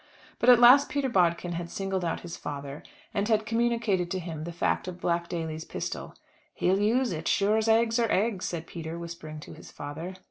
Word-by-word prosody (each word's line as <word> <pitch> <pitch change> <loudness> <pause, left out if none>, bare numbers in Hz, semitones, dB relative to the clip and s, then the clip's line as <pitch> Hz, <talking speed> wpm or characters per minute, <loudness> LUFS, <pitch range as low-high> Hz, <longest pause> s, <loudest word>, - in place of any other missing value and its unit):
But 240 - +4
at 245 - +9
last 255 +4 +8
Peter 280 -2 0
Bodkin 175 -4 +2
had 170 0 -4
singled 195 -1 -2
out 170 - -2
his 170 -1 -7
father, 140 0 -6 0.3
and 200 +1 0
had 220 -1 +2
communicated 230 -5 +1
to 190 - -2
him 160 -3 -6
the 170 - -5
fact 170 +2 -1
of 180 -1 -6
Black 170 -1 -1
Daly's 160 -2 -4
pistol. - - -5 0.4
"He'll 190 +2 +2
use 235 +4 +2
it, 160 -1 -4
as - - +1
sure 205 +2 +3
as 220 0 0
eggs 225 +1 +3
are 230 -2 +1
eggs," 205 -1 +1
said 165 -2 -4
Peter 165 -1 -6
whispering 170 -2 -7
to - - -10
his - - -12
father. 160 +6 -7
180 Hz, 210 wpm, -28 LUFS, 170-225 Hz, 0.4 s, at